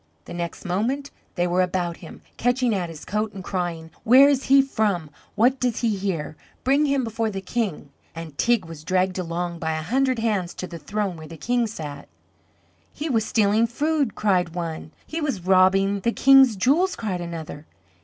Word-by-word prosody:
The -, -, -9 dB
next 170 Hz, +1 st, -5 dB
moment 240 Hz, +10 st, -1 dB, 0.2 s
they 175 Hz, -, +1 dB
were 180 Hz, +1 st, +1 dB
about 180 Hz, -2 st, -1 dB
him, 165 Hz, -, -12 dB
catching 245 Hz, 0 st, +1 dB
at 180 Hz, -4 st, -2 dB
his 160 Hz, -2 st, -10 dB
coat 210 Hz, 0 st, -2 dB
and 190 Hz, -, -7 dB
crying: 175 Hz, -4 st, -4 dB
"Where 260 Hz, +5 st, +7 dB
is 275 Hz, -2 st, +1 dB
he 275 Hz, +1 st, +6 dB
from, 210 Hz, -, 0 dB, 0.2 s
what 250 Hz, +5 st, +3 dB
does 245 Hz, -2 st, -1 dB
he 225 Hz, -3 st, +1 dB
here? 185 Hz, -6 st, -3 dB, 0.3 s
Bring 280 Hz, +3 st, +3 dB
him 275 Hz, -2 st, +1 dB
before 225 Hz, -1 st, -2 dB
the 195 Hz, -2 st, -4 dB
King!" 190 Hz, -, -3 dB, 0.2 s
And 165 Hz, -3 st, -8 dB
Teig 235 Hz, +2 st, +2 dB
was 165 Hz, -2 st, -10 dB
dragged 185 Hz, +1 st, 0 dB
along 170 Hz, 0 st, -3 dB
by 160 Hz, -1 st, -1 dB
a 155 Hz, 0 st, -3 dB
hundred 255 Hz, +7 st, +1 dB
hands 210 Hz, -6 st, -1 dB
to -, -, -5 dB
the 170 Hz, -2 st, -8 dB
throne 200 Hz, -3 st, -3 dB
where 155 Hz, -1 st, -10 dB
the 165 Hz, +1 st, -10 dB
King 240 Hz, +3 st, 0 dB
sat. 150 Hz, -9 st, -7 dB, 0.8 s
"He 310 Hz, +2 st, -5 dB
was 225 Hz, -3 st, +1 dB
stealing 220 Hz, +1 st, +2 dB
food," 290 Hz, +1 st, 0 dB
cried 180 Hz, -5 st, +1 dB
one. 165 Hz, -3 st, -5 dB
"He 325 Hz, +1 st, -4 dB
was 230 Hz, -, -2 dB
robbing 195 Hz, +1 st, +4 dB
the 235 Hz, +4 st, 0 dB
King's 270 Hz, -2 st, +6 dB
jewels," 295 Hz, -, +2 dB
cried 190 Hz, -6 st, -3 dB
another. 160 Hz, -3 st, -7 dB
195 Hz, 185 wpm, -23 LUFS, 175-240 Hz, 0.8 s, Where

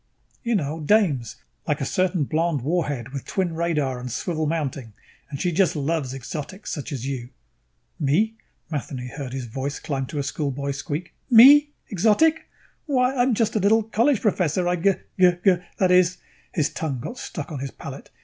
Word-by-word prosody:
"You 235 Hz, -1 st, 0 dB
know. 155 Hz, -3 st, -1 dB
Dames. 150 Hz, -, +2 dB, 0.3 s
Like 150 Hz, +1 st, 0 dB
a 135 Hz, -, -1 dB
certain 185 Hz, +1 st, +1 dB
blonde 160 Hz, 0 st, 0 dB
warhead 145 Hz, -6 st, -1 dB
with 135 Hz, -1 st, -6 dB
twin 185 Hz, -3 st, -1 dB
radar 150 Hz, -6 st, -1 dB
and 125 Hz, 0 st, -6 dB
swivel 155 Hz, +4 st, -2 dB
mounting, 140 Hz, -7 st, -3 dB, 0.4 s
and 140 Hz, -2 st, -6 dB
she 180 Hz, -, 0 dB
just 175 Hz, +1 st, +2 dB
loves 145 Hz, -2 st, -1 dB
exotics. 150 Hz, -, -6 dB
Such 145 Hz, -2 st, -5 dB
as 130 Hz, -3 st, -4 dB
you." 130 Hz, -3 st, -4 dB, 0.7 s
"Me?" 170 Hz, +10 st, +2 dB, 0.4 s
Matheny 130 Hz, -4 st, -4 dB
heard 135 Hz, -1 st, -6 dB
his 130 Hz, -1 st, -4 dB
voice 135 Hz, +4 st, -4 dB
climb 135 Hz, -3 st, -3 dB
to 150 Hz, -, -6 dB
a 140 Hz, -, 0 dB
schoolboy 140 Hz, 0 st, -2 dB
squeak. 145 Hz, +5 st, -5 dB, 0.2 s
"Me? 280 Hz, +5 st, +9 dB, 0.2 s
Exotic? 225 Hz, -, +3 dB, 0.4 s
Why, 255 Hz, -2 st, +2 dB
I'm 245 Hz, -1 st, +2 dB
just 225 Hz, 0 st, 0 dB
a -, -, +3 dB
little 215 Hz, +3 st, +4 dB
college 230 Hz, +3 st, +2 dB
professor. 180 Hz, -4 st, +1 dB
I 180 Hz, 0 st, +1 dB
g 195 Hz, +3 st, +3 dB, 0.3 s
g 180 Hz, -1 st, +7 dB
g, 190 Hz, -3 st, +6 dB, 0.2 s
that 185 Hz, -2 st, +3 dB
is 180 Hz, 0 st, +4 dB, 0.2 s
" -, -, -33 dB
His 150 Hz, -4 st, +1 dB
tongue 145 Hz, -6 st, -3 dB
got 245 Hz, -, -7 dB
stuck 150 Hz, -4 st, -6 dB
on 145 Hz, -, -4 dB
his 135 Hz, +1 st, -4 dB
palate. -, -, -9 dB
160 Hz, 180 wpm, -24 LUFS, 140-195 Hz, 0.7 s, Me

